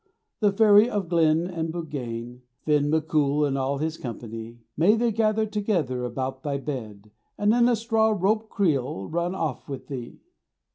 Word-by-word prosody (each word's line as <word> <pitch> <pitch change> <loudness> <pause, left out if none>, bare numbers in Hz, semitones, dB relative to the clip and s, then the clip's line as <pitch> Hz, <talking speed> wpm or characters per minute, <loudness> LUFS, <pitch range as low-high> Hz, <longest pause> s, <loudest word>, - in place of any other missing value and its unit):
The 205 -2 +3
Fairy 210 +2 +6
of 205 -4 -1
the 170 - -14
Glen 160 +1 +3
and 165 -3 -3
the - - -10
Buggane, 125 -7 -5 0.2
Finn 150 -1 +2
MacCool 150 -2 +2
and 135 - -1
all 135 +1 -1
his 160 +2 -2
company; 115 -1 -7 0.2
May 190 +7 +4
they 235 +1 +1
gather 220 0 +1
together 190 - -1
about 130 +2 -4
thy 140 -1 -2
bed, 110 -8 -7 0.3
And 205 +1 +3
in 240 0 +4
a 240 - +3
straw 225 0 +2
rope 215 +4 +1
creel 135 - 0
run 170 +3 -2
off 155 -8 -3
with 135 -2 -7
thee. 125 -4 -6
155 Hz, 175 wpm, -25 LUFS, 130-205 Hz, 0.3 s, Fairy